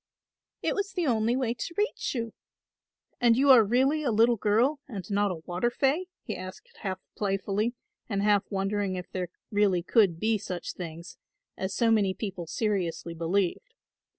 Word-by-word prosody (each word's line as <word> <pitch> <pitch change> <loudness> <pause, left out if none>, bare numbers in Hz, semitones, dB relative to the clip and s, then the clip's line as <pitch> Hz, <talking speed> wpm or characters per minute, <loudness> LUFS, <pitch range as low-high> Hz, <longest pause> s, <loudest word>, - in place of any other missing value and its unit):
"It - - +1
was 395 -1 -2
the 355 -3 0
only 230 -2 +2
way 255 -3 0
to 245 +8 -6
reach 415 - -1
you." 230 -2 -3 0.9
"And 235 -1 +4
you 275 +1 +6
are 245 -4 +9
really 265 +8 +2
a 285 - 0
little 230 +2 +4
girl 230 +8 +2
and 205 -8 -6
not 205 0 +2
a 165 -4 -5
water 180 +7 0
fay?" 275 +9 +1 0.2
he - - -4
asked 185 0 -10
half 190 -2 -3 0.2
playfully 205 +3 -1 0.3
and 200 -2 0
half 205 -1 +3
wondering 195 -1 -1
if 180 -1 -7
there 180 -2 -3 0.2
really 200 -4 +2
could 185 -4 +3
be 220 +1 +1
such 180 -2 -5
things, 170 0 -8 0.4
as 190 0 -3
so 230 -1 +3
many 200 -4 +3
people 190 -6 -5
seriously 175 -3 -1
believed. 170 +3 -1
205 Hz, 170 wpm, -28 LUFS, 185-240 Hz, 0.9 s, are